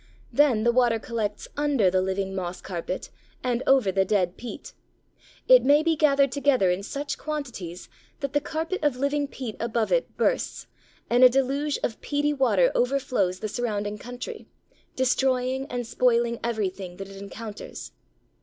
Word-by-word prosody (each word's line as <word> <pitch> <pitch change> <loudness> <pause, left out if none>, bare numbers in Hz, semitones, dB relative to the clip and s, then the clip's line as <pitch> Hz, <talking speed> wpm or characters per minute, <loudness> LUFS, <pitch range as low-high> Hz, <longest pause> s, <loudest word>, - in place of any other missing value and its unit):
Then 265 -7 +4
the 235 - +4
water 240 -2 +3
collects 220 -2 -3
under 280 -10 +2
the 185 0 +2
living 190 +1 -2
moss 185 -1 -4
carpet 185 0 -5 0.3
and 250 -1 0
over 260 -8 +4
the 190 0 +2
dead 185 -3 +1
peat. 240 - -8 0.7
It - - +8
may 290 +3 +5
be 330 0 +2
gathered 280 -3 +3
together 260 -9 +3
in 180 +2 -1
such 280 +7 -4
quantities 245 - -5 0.3
that 280 -1 -4
the 290 - +2
carpet 320 +4 -3
of 295 -4 +2
living 285 +2 0
peat 255 -5 -6
above 230 -1 -1
it - - 0
bursts, - - 0 0.4
and 245 +2 +4
a 255 - +10
deluge 275 +3 0
of 225 - -2
peaty 290 0 0
water 290 - +3
overflows 245 -8 0
the 215 - -2
surrounding 210 -2 -3
country, 245 - -7 0.5
destroying 260 0 +1
and 245 -2 -3
spoiling 235 0 +1
everything 195 -6 -3
that 195 - -7
it 195 - -11
encounters. 205 +2 -8
245 Hz, 155 wpm, -26 LUFS, 205-280 Hz, 0.7 s, a